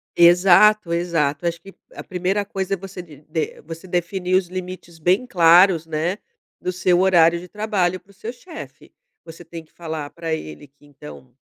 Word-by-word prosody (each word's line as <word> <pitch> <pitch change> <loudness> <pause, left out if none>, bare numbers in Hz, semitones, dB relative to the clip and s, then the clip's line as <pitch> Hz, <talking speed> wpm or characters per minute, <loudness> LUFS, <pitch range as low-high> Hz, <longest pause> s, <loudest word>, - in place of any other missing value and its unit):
Exato, 180 +2 +5
exato. 165 -3 -1
Acho 170 0 -3
que, 195 +1 -14 0.2
a - - -8
primeira 185 +3 -2
coisa 195 -1 -3
é - - -11
você 190 0 -9
di 160 -5 -15
de 160 0 -4
você 165 +4 -10
definir 180 +1 -1
os 185 -1 +2
limites 180 -2 -8
bem 185 +9 +2
claros, 175 -3 +5
né, 160 +5 -2 0.4
do 180 - -2
seu 180 0 +1
horário 170 -3 +4
de 180 - -11
trabalho, 190 -3 -1
para 195 - -24
o - - -21
seu 220 +4 -7
chefe. 320 +6 -12 0.3
Você 165 +1 -12
tem 165 0 -9
que - - -33
falar 160 -4 -6
pra 165 -1 -4
ele 80 - -7
que 140 +2 -26
então, 75 - -14
175 Hz, 185 wpm, -21 LUFS, 165-190 Hz, 0.4 s, Exato